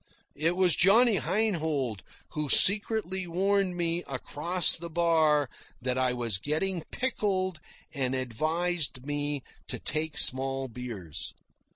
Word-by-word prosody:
It 165 Hz, +4 st, 0 dB
was 180 Hz, -4 st, +2 dB
Johnny 215 Hz, +4 st, +4 dB
Heinhold 160 Hz, -, -1 dB, 0.3 s
who 150 Hz, -2 st, -4 dB
secretly 200 Hz, -1 st, +3 dB
warned 190 Hz, +1 st, 0 dB
me 170 Hz, 0 st, -1 dB
across 160 Hz, +6 st, 0 dB
the 170 Hz, +1 st, -7 dB
bar 160 Hz, -3 st, +2 dB, 0.3 s
that 125 Hz, 0 st, -2 dB
I 130 Hz, -1 st, +1 dB
was 120 Hz, -5 st, 0 dB
getting 160 Hz, -, -2 dB
pickled 190 Hz, -9 st, -2 dB, 0.3 s
and 130 Hz, -3 st, -1 dB
advised 155 Hz, +3 st, -1 dB
me 145 Hz, -1 st, -3 dB, 0.2 s
to -, -, -4 dB
take 155 Hz, 0 st, -3 dB
small 135 Hz, +1 st, +5 dB
beers. 115 Hz, -, -7 dB
160 Hz, 115 wpm, -28 LUFS, 135-185 Hz, 0.3 s, small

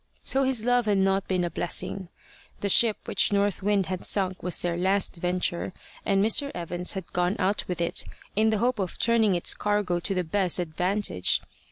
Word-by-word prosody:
So 270 Hz, 0 st, +1 dB
his 255 Hz, -4 st, 0 dB
love 245 Hz, -2 st, +2 dB
had 205 Hz, -1 st, +2 dB
not 195 Hz, 0 st, +1 dB
been 185 Hz, -2 st, 0 dB
a 175 Hz, -, -2 dB
blessing. 180 Hz, +1 st, -3 dB, 0.5 s
The 200 Hz, -, -1 dB
ship 220 Hz, +2 st, +5 dB
which -, -, +2 dB
North 200 Hz, -1 st, +1 dB
Wind 200 Hz, -1 st, +1 dB
had 185 Hz, 0 st, -5 dB
sunk 185 Hz, -2 st, +1 dB
was 180 Hz, -, +1 dB
their 175 Hz, -1 st, -1 dB
last 190 Hz, +1 st, +1 dB
venture, 180 Hz, 0 st, -1 dB, 0.3 s
and 195 Hz, 0 st, +2 dB
Mr. 280 Hz, +6 st, +3 dB
Evans 175 Hz, +1 st, -1 dB
had 190 Hz, -3 st, -7 dB
gone 180 Hz, +2 st, 0 dB
out 195 Hz, +2 st, 0 dB
with 180 Hz, -2 st, -4 dB
it 170 Hz, 0 st, +1 dB, 0.3 s
in 220 Hz, +2 st, +3 dB
the 220 Hz, -, +1 dB
hope 240 Hz, +1 st, 0 dB
of 185 Hz, -3 st, -3 dB
turning 225 Hz, -4 st, +2 dB
its 175 Hz, -, +1 dB
cargo 205 Hz, -4 st, -1 dB
to 195 Hz, +3 st, -3 dB
the 180 Hz, -, 0 dB
best 180 Hz, +1 st, 0 dB
advantage. 180 Hz, -, 0 dB
195 Hz, 195 wpm, -26 LUFS, 180-210 Hz, 0.5 s, ship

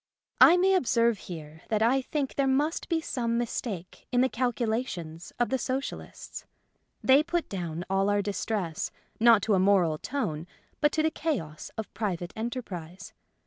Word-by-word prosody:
I 345 Hz, -, +9 dB
may 380 Hz, +2 st, +4 dB
observe 235 Hz, -, +2 dB
here 160 Hz, -2 st, -8 dB
that 220 Hz, -1 st, +2 dB
I 260 Hz, +4 st, +3 dB
think 275 Hz, +1 st, -2 dB
there 275 Hz, -1 st, +1 dB
must 290 Hz, +5 st, 0 dB
be 330 Hz, -2 st, +1 dB
some 235 Hz, -6 st, -1 dB
mistake 215 Hz, -6 st, -4 dB
in 245 Hz, -1 st, +3 dB
the 260 Hz, -, +3 dB
calculations 225 Hz, -10 st, -2 dB
of 240 Hz, -, +1 dB
the 265 Hz, -, 0 dB
Socialists. 265 Hz, +2 st, -5 dB, 0.6 s
They 265 Hz, +2 st, +6 dB
put 340 Hz, +1 st, -1 dB
down 175 Hz, -3 st, -4 dB
all 195 Hz, +1 st, +1 dB
our 205 Hz, 0 st, +2 dB
distress, 195 Hz, -4 st, -2 dB, 0.3 s
not 230 Hz, -3 st, +6 dB
to 220 Hz, -, +2 dB
a 190 Hz, -, +4 dB
moral 185 Hz, -5 st, +3 dB
tone, 175 Hz, -, -3 dB, 0.3 s
but 295 Hz, -1 st, +3 dB
to 310 Hz, -, +1 dB
the 315 Hz, -, +2 dB
chaos 195 Hz, -, -3 dB
of 220 Hz, -, -5 dB
private 180 Hz, -5 st, -3 dB
enterprise. 190 Hz, -7 st, -6 dB
225 Hz, 160 wpm, -28 LUFS, 185-265 Hz, 0.6 s, I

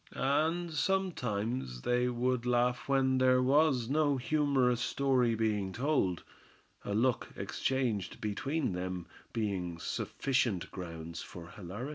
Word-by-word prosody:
And 160 Hz, +5 st, +1 dB
sometimes 125 Hz, -, -1 dB
they 125 Hz, 0 st, +2 dB
would 125 Hz, 0 st, 0 dB
laugh 125 Hz, +1 st, +1 dB
when 130 Hz, -1 st, +3 dB
there 130 Hz, 0 st, +5 dB
was 135 Hz, -2 st, +3 dB
no 145 Hz, 0 st, +2 dB
humorous 130 Hz, -3 st, +2 dB
story 125 Hz, -3 st, +2 dB
being 105 Hz, -3 st, 0 dB
told; 120 Hz, -, 0 dB, 0.6 s
a 100 Hz, -, -2 dB
look 120 Hz, +2 st, +2 dB
exchanged 120 Hz, -8 st, -1 dB
between 130 Hz, -, -1 dB
them 90 Hz, -1 st, -3 dB, 0.3 s
being 95 Hz, -6 st, -2 dB
sufficient 120 Hz, +2 st, -1 dB
grounds 85 Hz, -2 st, -6 dB
for 85 Hz, -1 st, -9 dB
hilarity. 105 Hz, +8 st, -6 dB
125 Hz, 115 wpm, -32 LUFS, 100-135 Hz, 0.6 s, there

